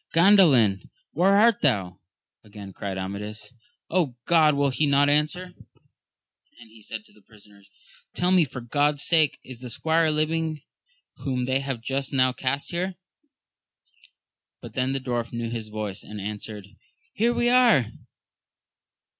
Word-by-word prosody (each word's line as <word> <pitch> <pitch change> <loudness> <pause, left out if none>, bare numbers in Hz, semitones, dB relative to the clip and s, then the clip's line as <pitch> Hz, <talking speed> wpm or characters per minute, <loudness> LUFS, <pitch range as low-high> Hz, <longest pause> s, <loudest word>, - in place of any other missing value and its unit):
Gandalin? 165 - +5 0.2
where 195 +3 +3
art 225 +1 +4
thou? 95 -10 0 0.4
again 100 -2 -11
cried 95 0 -5
Amadis. 105 +5 -6 0.7
God! 155 -3 +4
will 140 -1 +1
he 150 +3 0
not 140 0 +3
answer? 155 +5 0 1.1
and 115 -2 -15
he 110 -1 -17
said 110 0 -8
to - - -21
the 105 - -22
prisoners, 100 -1 -20 0.5
tell 180 +1 +1
me 185 -2 +5
for 125 -3 -6
God's 145 +4 0
sake 160 -3 +3
is 130 -2 -11
the 125 -1 -8
squire 160 +6 +1
living 155 0 -1 0.5
whom 130 -3 -2
they 130 +1 0
have 135 -4 -4
just 135 +2 -3
now 130 -1 +3
cast 135 +2 -3
here? 180 +2 -3 1.6
but - - -11
then 130 0 -1
the 135 - -1
dwarf 120 -3 -3
knew 115 -1 -4
his 115 -2 -5
voice, 105 -2 -5
and 105 0 -9
answered, 105 0 -7 0.4
Here 230 +3 +1
we 240 - +1
are 235 - +4
130 Hz, 145 wpm, -25 LUFS, 110-155 Hz, 1.6 s, Gandalin